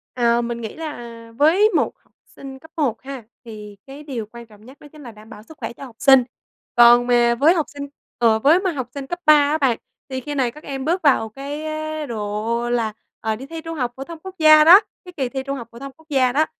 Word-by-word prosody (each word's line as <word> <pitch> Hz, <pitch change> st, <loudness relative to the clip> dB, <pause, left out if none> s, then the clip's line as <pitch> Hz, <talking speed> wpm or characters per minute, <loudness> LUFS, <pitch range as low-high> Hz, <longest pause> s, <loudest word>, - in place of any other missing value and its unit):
Ờ, 235 Hz, -1 st, +2 dB
mình 235 Hz, 0 st, -4 dB
nghĩ 220 Hz, -, -7 dB
là 295 Hz, -7 st, -7 dB, 0.3 s
với 345 Hz, +9 st, +4 dB
một -, -, +1 dB
học -, -, -37 dB
sinh 270 Hz, -1 st, -12 dB
cấp 320 Hz, +3 st, -18 dB
1 250 Hz, -8 st, -1 dB
ha, 265 Hz, -3 st, -8 dB, 0.2 s
thì 210 Hz, -2 st, -10 dB
cái 280 Hz, +2 st, -11 dB
điều 255 Hz, -7 st, -5 dB
quan 235 Hz, 0 st, -11 dB
trọng 215 Hz, -1 st, -19 dB
nhất 260 Hz, +3 st, -15 dB
đó 295 Hz, -, -14 dB
chính 305 Hz, -, -14 dB
là 240 Hz, -, -9 dB
đảm 215 Hz, +1 st, -16 dB
bảo 210 Hz, -, -12 dB
sức 315 Hz, +6 st, -16 dB
khỏe 265 Hz, -, -6 dB
cho 275 Hz, -, -12 dB
học 245 Hz, -4 st, -14 dB
sinh. 270 Hz, -2 st, +6 dB, 0.5 s
Còn 240 Hz, 0 st, +6 dB
mà 240 Hz, -1 st, +3 dB
với 295 Hz, +8 st, +4 dB
học 320 Hz, -4 st, 0 dB
sinh 285 Hz, 0 st, -8 dB, 0.3 s
ờ, 225 Hz, -2 st, +3 dB
với 300 Hz, +9 st, +4 dB
mà 375 Hz, -1 st, -1 dB
học 260 Hz, -6 st, -5 dB
sinh 275 Hz, -1 st, -7 dB
cấp 350 Hz, +5 st, -5 dB
3 305 Hz, -, +8 dB
á 295 Hz, +1 st, +3 dB
bạn, 265 Hz, -6 st, +1 dB, 0.3 s
thì 260 Hz, -1 st, -4 dB
khi 295 Hz, +2 st, -6 dB
này 255 Hz, -4 st, 0 dB
các 300 Hz, +5 st, -15 dB
em 270 Hz, -2 st, -6 dB
bước 350 Hz, +4 st, 0 dB
vào 255 Hz, -7 st, +2 dB
cái, 285 Hz, +6 st, -7 dB
ơ, 310 Hz, 0 st, -4 dB
độ 225 Hz, +1 st, -3 dB
là, 230 Hz, -3 st, -1 dB, 0.3 s
ờ, 220 Hz, 0 st, -2 dB
đi 255 Hz, +5 st, -9 dB
thi 325 Hz, +3 st, -8 dB
Trung 330 Hz, 0 st, -7 dB
học 250 Hz, -3 st, -2 dB
phổ 270 Hz, -, -6 dB
thông 330 Hz, +2 st, -10 dB
Quốc 380 Hz, +3 st, -10 dB
gia 310 Hz, -1 st, +7 dB
đó, 350 Hz, +6 st, +9 dB, 0.3 s
cái 360 Hz, -, -10 dB
kỳ 260 Hz, -3 st, -1 dB
thi 265 Hz, 0 st, -5 dB
Trung 275 Hz, 0 st, -4 dB
học 235 Hz, -3 st, -8 dB
phổ 235 Hz, -, -13 dB
thông 275 Hz, 0 st, -8 dB
Quốc 320 Hz, 0 st, -24 dB
gia 260 Hz, -3 st, +2 dB
đó. 305 Hz, +4 st, +2 dB
270 Hz, 260 wpm, -21 LUFS, 235-305 Hz, 0.5 s, đó